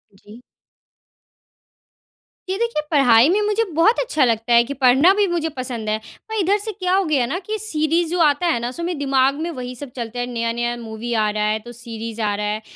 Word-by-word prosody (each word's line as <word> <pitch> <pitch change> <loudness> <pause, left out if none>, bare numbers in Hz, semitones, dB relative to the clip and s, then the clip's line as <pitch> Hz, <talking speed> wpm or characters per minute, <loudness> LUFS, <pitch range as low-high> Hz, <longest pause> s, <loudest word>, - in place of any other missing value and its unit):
जी। 210 +4 -15 2.1
ये 380 - -1
देखिए 465 -7 -1
पढ़ाई 255 -3 +5
में 400 +4 +2
मुझे 425 +2 +1
बहुत 385 +9 +4
अच्छा 475 - +1
लगता 230 0 0
है 235 0 +6
कि 265 +4 -5
पढ़ना 270 +6 +5
भी 410 0 +2
मुझे 340 -2 -1
पसंद 240 -4 -4
है। 215 - +1 0.3
और 440 - -4
इधर 395 +2 +2
से 430 +2 -4
क्या 370 -3 -2
हो 390 - +3
गया 285 -6 +1
ना 315 +10 -3
कि 435 0 -2
सीरीज़ 330 -4 0
जो 355 - -1
आता 300 +2 +3
है 320 -8 +1
ना 240 +1 -3
सो 335 +7 -7
मेरे 345 -3 -3
दिमाग 270 -1 +2
में 335 - -2
वही 250 -4 -6
सब 280 +2 -8
चलता 240 -1 -5
है, 245 - -1
नया-नया 240 0 -2
मूवी 225 +2 -5
आ 215 -2 +2
रहा 210 0 -2
है, 215 +1 0
तो 240 +3 -11
सीरीज़ 230 -1 -7
आ 210 -1 0
रहा 210 +1 -3
है 210 +1 -2
260 Hz, 220 wpm, -21 LUFS, 230-345 Hz, 2.1 s, है